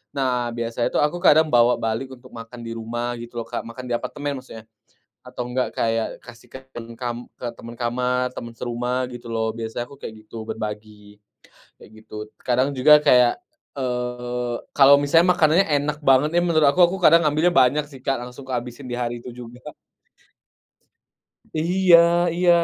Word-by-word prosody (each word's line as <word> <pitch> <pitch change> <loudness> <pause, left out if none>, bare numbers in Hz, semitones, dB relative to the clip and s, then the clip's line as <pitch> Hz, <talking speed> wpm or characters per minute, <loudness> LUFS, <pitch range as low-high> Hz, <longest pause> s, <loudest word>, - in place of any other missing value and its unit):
Nah, 125 -3 -1
biasanya 115 0 -2
tuh - - +1
aku 150 +4 0
kadang 160 -2 +6
bawa 120 -3 +4
balik 115 +4 -3
untuk 125 +1 -17
makan 115 +1 -10
di 115 - -5
rumah, 120 +2 -4
gitu 120 0 -7
loh 115 - -9
Kak - - -4
makan 125 +2 -9
di 120 - -3
apartemen 145 +3 -4
maksudnya, 110 -4 -12 0.6
atau 125 -1 -7
enggak 125 +1 -1
kayak 115 0 0 0.2
kasih 120 -1 -14
kan 130 0 -10 0.3
kam 120 -1 -3 0.2
ke 125 - -5
temen 115 0 -10
kamar, 125 +1 -1
temen 115 0 -7
serumah 125 +1 -2
gitu 120 -1 -10
loh, 110 -1 -1
biasanya 115 +1 -5
aku 140 - -13
kayak 110 -1 -9
gituk 115 +1 -8
berbagi, 105 -1 -8 0.6
kayak - - -14 0.2
gitu - - -12 0.3
kadang 130 +2 +1
juga 150 +3 +7
kayak, 125 - +4 0.4
eee, 125 -1 -3 0.2
kalo 140 0 +8
misalnya 165 +5 +4
makanannya 170 +2 +3
enak 145 +1 -2
banget 135 +2 +4
ya, - - +4
menurut 155 -4 +3
aku 180 +6 +2
aku 180 +3 -3
kadang 170 -1 +6
ngambilnya 155 +4 +3
banyak 145 +3 +4
sih 140 - -12
Kak, 135 -2 0
langsung 125 +2 -10
ku 130 - -6
habisin 125 +2 -5
di - - -4
hari 120 -1 -3
itu 125 - -8
juga. 125 +1 -11 1.8
Iya 180 +2 +4 0.4
iya, 175 0 +3
125 Hz, 170 wpm, -22 LUFS, 120-140 Hz, 1.8 s, kalo